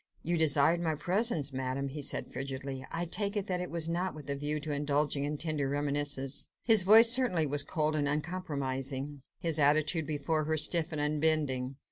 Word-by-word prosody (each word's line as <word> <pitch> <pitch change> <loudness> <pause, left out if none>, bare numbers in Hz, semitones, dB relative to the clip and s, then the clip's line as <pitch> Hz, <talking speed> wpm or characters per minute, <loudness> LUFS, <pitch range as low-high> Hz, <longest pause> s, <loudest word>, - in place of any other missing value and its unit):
"You 175 +2 -1
desired 160 +1 +3
my 160 -2 -1
presence, 175 - 0
Madame," 130 +1 -3
he 145 +2 -7
said 140 - -2
frigidly. 135 0 -6
"I 170 +1 -3
take 200 +4 -1
it 200 - -2
that 180 -3 -3
it 180 - -5
was 165 -1 -2
not 175 +2 -3
with 145 -2 -7
a - - -2
view 145 +2 -3
to 150 0 -4
indulging 145 0 -1
in 150 +1 -4
tender 150 -3 -2
reminiscences." 145 -1 -1
His 220 -4 +5
voice 220 +5 +8
certainly 240 -11 +3
was 145 0 +1
cold 155 +1 -2
and 145 -2 -1
uncompromising: 140 -3 -3 0.2
his 165 -3 -3
attitude 155 +2 +2
before 155 +1 -2
her, 160 +1 -1
stiff 165 +2 +4
and 155 - -4
unbending. 150 -3 -1
150 Hz, 185 wpm, -30 LUFS, 140-170 Hz, 0.2 s, voice